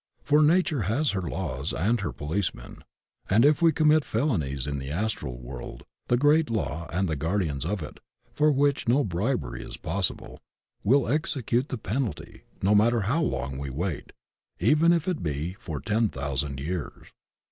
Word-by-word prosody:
For 150 Hz, +3 st, +4 dB
nature 155 Hz, -3 st, +3 dB
has 140 Hz, +6 st, +1 dB
her 95 Hz, -, -2 dB
laws 80 Hz, -6 st, -3 dB
and 110 Hz, +6 st, +1 dB
her 85 Hz, -7 st, -2 dB
policemen, 75 Hz, +1 st, -4 dB, 0.5 s
and 110 Hz, +7 st, +5 dB
if 150 Hz, +2 st, +4 dB
we 165 Hz, -1 st, +6 dB
commit 155 Hz, -1 st, +4 dB
felonies 85 Hz, -, -1 dB
in 70 Hz, -1 st, -2 dB
the 65 Hz, 0 st, -6 dB
Astral 75 Hz, -, -2 dB
world -, -, -8 dB, 0.2 s
the 120 Hz, -, +3 dB
great 150 Hz, +3 st, +4 dB
Law 85 Hz, -, -2 dB
and 95 Hz, +3 st, 0 dB
the 80 Hz, -, -1 dB
guardians 80 Hz, -3 st, -1 dB
of 95 Hz, -3 st, -2 dB
it, -, -, -9 dB, 0.3 s
for 150 Hz, 0 st, +3 dB
which 140 Hz, -1 st, +1 dB
no 130 Hz, +5 st, +4 dB
bribery 85 Hz, -, -2 dB
is -, -, -8 dB
possible, 95 Hz, +2 st, -3 dB, 0.4 s
will 130 Hz, +6 st, +3 dB
execute 130 Hz, -2 st, 0 dB
the 130 Hz, -, -3 dB
penalty, 110 Hz, -, -4 dB, 0.2 s
no 100 Hz, +2 st, +4 dB
matter 115 Hz, +2 st, +4 dB
how 125 Hz, +12 st, +1 dB
long 65 Hz, -, -2 dB
we 70 Hz, 0 st, -4 dB
wait, 80 Hz, +4 st, -4 dB, 0.5 s
even 150 Hz, -, +4 dB
if 170 Hz, 0 st, +1 dB
it 180 Hz, -4 st, -1 dB
be 75 Hz, +3 st, -2 dB
for 80 Hz, -5 st, -5 dB
ten 105 Hz, -, +1 dB
thousand 70 Hz, -1 st, -3 dB
years. 85 Hz, +3 st, -5 dB
100 Hz, 170 wpm, -27 LUFS, -, 0.5 s, we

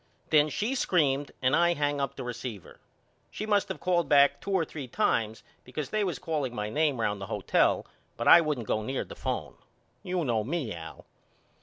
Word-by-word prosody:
Then 155 Hz, -1 st, +5 dB
she 215 Hz, -, -1 dB
screamed 145 Hz, -, +1 dB
and 130 Hz, +2 st, +4 dB
I 170 Hz, +1 st, +3 dB
hangup 145 Hz, -2 st, -1 dB
the -, -, -6 dB
receiver. 120 Hz, -5 st, -7 dB, 0.5 s
She 215 Hz, -, -5 dB
must 205 Hz, -2 st, +1 dB
of 190 Hz, -, -5 dB
called 175 Hz, -5 st, +1 dB
back 140 Hz, -1 st, +5 dB
two -, -, -7 dB
or 190 Hz, -4 st, +2 dB
three 145 Hz, -4 st, -7 dB
times 110 Hz, -2 st, 0 dB, 0.2 s
because 135 Hz, +2 st, -6 dB
they 215 Hz, -1 st, +1 dB
was 180 Hz, -4 st, -2 dB
calling 150 Hz, -8 st, -3 dB
my 105 Hz, -1 st, -3 dB
name 150 Hz, -2 st, +1 dB
round 105 Hz, -3 st, -1 dB
the 95 Hz, -, -5 dB
hotel 105 Hz, -3 st, +1 dB, 0.3 s
but -, -, -2 dB
I 170 Hz, -, +9 dB
wouldn't 150 Hz, -7 st, -2 dB
go 110 Hz, -, 0 dB
near 130 Hz, +5 st, -3 dB
the -, -, -10 dB
phone. -, -, -3 dB, 0.5 s
You 180 Hz, -3 st, -2 dB
know 115 Hz, -4 st, +1 dB
me 135 Hz, -3 st, -3 dB
Al. 80 Hz, -1 st, -10 dB
145 Hz, 190 wpm, -28 LUFS, 120-170 Hz, 0.5 s, I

